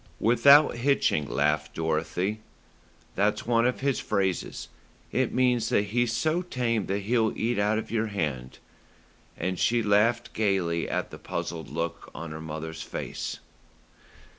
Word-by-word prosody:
"Without 130 +5 +6
hitching," 120 - +1
laughed 75 +1 0
Dorothy. 80 +6 -1 0.7
"That's 105 +2 0
one 115 0 +3
of 125 - -2
his 140 -1 +1
phrases. 95 -4 -2 0.4
It - - +1
means 125 -3 +2
that 100 - +3
he's 115 +3 0
so 155 +9 +1
tame 120 - -1
that 100 +1 -1
he'll 110 +1 +1
eat 115 -1 0
out 105 +1 +2
of 110 - -5
your 115 -1 0
hand;" 75 -11 -3 0.8
and 90 +1 -2
she 120 0 +2
laughed 115 +3 +2
gaily 95 -6 0
at - - -2
the - - -9
puzzled 80 -2 -5
look 85 +2 -4
on 85 0 -6
her 80 +1 -7
mother's 80 0 -6
face. - - -5
105 Hz, 140 wpm, -27 LUFS, 85-120 Hz, 0.8 s, Without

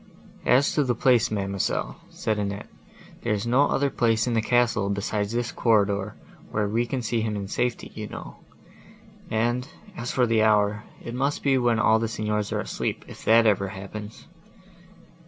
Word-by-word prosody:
"As 135 +3 +4
to 150 - +2
the 125 -3 0
place, 120 0 +3
mademoiselle," 100 -2 -2
said 110 -1 -2
Annette, 100 0 -3 0.5
"there - - 0
is 105 +1 -2
no 125 +4 +4
other 140 0 +1
place 115 -2 +2
in 120 - -1
the 115 - +2
castle, 115 -3 +2
besides 100 +1 -1
this 120 0 -1
corridor, 100 -3 +1 0.3
where 105 -1 0
we 115 +3 0
can 125 +1 -3
see 115 0 0
him 110 -1 -2
in 100 -1 -4
safety, 120 +4 -2
you 110 -1 -6
know; - - -9 0.9
and, 120 +3 0 0.3
as 120 -5 -5
for 125 - +3
the 115 -2 +2
hour,—it 105 +2 0
must 140 +3 -1
be 140 -1 +3
when 120 -2 +2
all 110 0 +4
the 115 - -1
Signors 105 -2 -2
are - - 0
asleep, - - -3
if - - -11
that 115 +1 +6
ever 100 -2 +3
happens!" 105 +2 -8
110 Hz, 175 wpm, -25 LUFS, 105-120 Hz, 0.9 s, that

